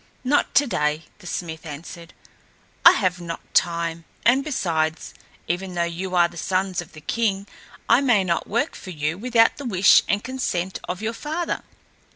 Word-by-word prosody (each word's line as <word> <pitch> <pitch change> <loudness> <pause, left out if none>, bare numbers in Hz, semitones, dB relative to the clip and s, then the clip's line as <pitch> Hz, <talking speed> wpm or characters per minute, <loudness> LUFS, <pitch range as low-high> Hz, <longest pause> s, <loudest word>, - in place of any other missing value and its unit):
"Not 275 +3 +1
today," 155 - +2 0.2
the 180 - -12
smith 160 -3 -5
answered. 165 +2 -9 0.7
"I - - +10
have 180 -2 0
not 170 -1 -8
time; 170 -1 +1 0.2
and 255 +4 +4
besides, 160 - -1 0.3
even 180 +1 -3
though 170 - +1
you 180 +2 -3
are 175 -1 +5
the 170 0 -14
sons 185 +1 -1
of 160 - -14
the 155 - -12
king, 200 +1 -1 0.4
I 235 +4 +5
may 240 -8 +3
not 170 -2 -1
work 230 +4 0
for - - -10
you 155 -2 -2
without 230 0 +3
the 285 - -7
wish 195 -5 +6
and 205 +1 0
consent 190 -8 -2
of 180 +4 -4
your 225 +1 -1
father. 315 +7 -3
185 Hz, 170 wpm, -23 LUFS, 170-230 Hz, 0.7 s, I